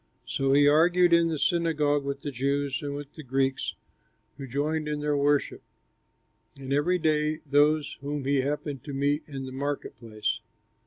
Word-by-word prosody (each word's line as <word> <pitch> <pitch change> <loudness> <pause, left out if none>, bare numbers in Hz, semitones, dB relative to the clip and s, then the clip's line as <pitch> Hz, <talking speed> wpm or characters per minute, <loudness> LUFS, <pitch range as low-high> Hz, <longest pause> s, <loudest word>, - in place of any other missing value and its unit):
So 135 0 0
he 145 +1 +6
argued 175 +4 +4
in 170 0 +5
the 160 -2 -1
synagogue 150 -3 +1
with 140 0 -4
the 145 - -3
Jews 140 +3 -1
and 145 -1 -4
with 145 0 -8
the 155 - -9
Greeks 135 0 -1 0.6
who 135 - -6
joined 150 +4 -1
in 150 -1 -2
their 150 0 0
worship, 145 0 +1 1.0
and 135 0 -4
every 150 +6 +2
day 155 -2 +1
with 155 -2 -14
those 150 +1 +3
whom 145 -1 -4
he 140 -1 +2
happened 145 -1 -3
to 145 - -6
meet 145 +2 +1
in 135 -3 -6
the 130 - -7
market 140 +2 -4
place. 110 -2 -3
145 Hz, 175 wpm, -27 LUFS, 140-150 Hz, 1.0 s, he